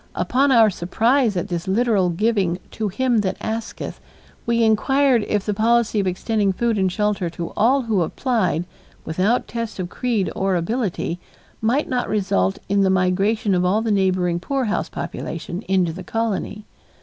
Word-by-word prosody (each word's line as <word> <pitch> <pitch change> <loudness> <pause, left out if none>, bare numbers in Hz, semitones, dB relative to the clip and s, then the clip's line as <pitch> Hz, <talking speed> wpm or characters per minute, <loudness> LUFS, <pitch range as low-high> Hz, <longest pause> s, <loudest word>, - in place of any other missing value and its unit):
Upon 275 +2 +2
our 225 -4 +6
surprise 225 +5 +1
at 175 - -2
this 175 0 -3
literal 205 -2 +2
giving 190 -1 +1
"to 220 - -2
him 240 +4 +1
that 195 -3 -1
asketh," 225 0 -5 0.5
we 235 0 +2
inquired 255 +2 +3
if 205 -2 -1
the 210 - 0
policy 225 +1 +2
of 195 - 0
extending 200 +2 0
food 230 +1 0
and 190 -1 +1
shelter 210 -3 0
to 170 0 -6
all 260 +5 +3
who 220 -5 +1
applied, 180 - 0 0.4
without 190 +9 0
test 230 -3 -5
of 180 -2 -4
creed 230 -5 -1
or 190 -1 0
ability, 180 -2 -2 0.4
might 245 +7 +1
not 250 -1 -1
result 140 - +1
in 200 +1 +2
the 190 - +3
migration 195 +3 +1
of 180 -1 +2
all 200 +5 +2
the 225 - 0
neighboring 185 -3 +1
poorhouse 255 +2 -1
population 175 +3 -5
into 185 -3 +1
the 185 - -8
colony. 215 -1 -3
210 Hz, 160 wpm, -21 LUFS, 185-230 Hz, 0.5 s, our